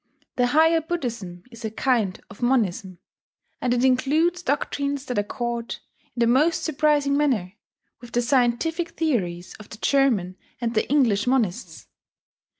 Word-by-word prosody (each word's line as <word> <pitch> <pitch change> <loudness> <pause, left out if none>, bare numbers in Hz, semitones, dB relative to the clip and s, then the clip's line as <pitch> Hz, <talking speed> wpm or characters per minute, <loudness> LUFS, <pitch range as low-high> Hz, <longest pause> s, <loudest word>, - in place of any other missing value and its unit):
The 245 -1 +2
higher 320 +5 +4
Buddhism 235 - -5
is 230 0 -12
a 220 - -2
kind 220 -4 0
of 200 - -14
Monism; 200 -7 0 0.6
and 250 - 0
it 245 +1 +2
includes 300 +7 +2
doctrines 280 -2 -2
that 250 -6 -1
accord, 235 +3 -3 0.4
in 240 - -3
the - - +5
most 280 +8 +2
surprising 295 -2 +2
manner, 245 -11 0 0.5
with 240 0 -13
the 240 - +1
scientific 275 +7 0
theories 185 - -1
of 210 - -13
the 215 - -10
German 225 -9 +1 0.2
and 235 -1 -2
the 220 - 0
English 245 -7 +2
monists. 195 -10 -1
245 Hz, 145 wpm, -24 LUFS, 215-285 Hz, 0.6 s, the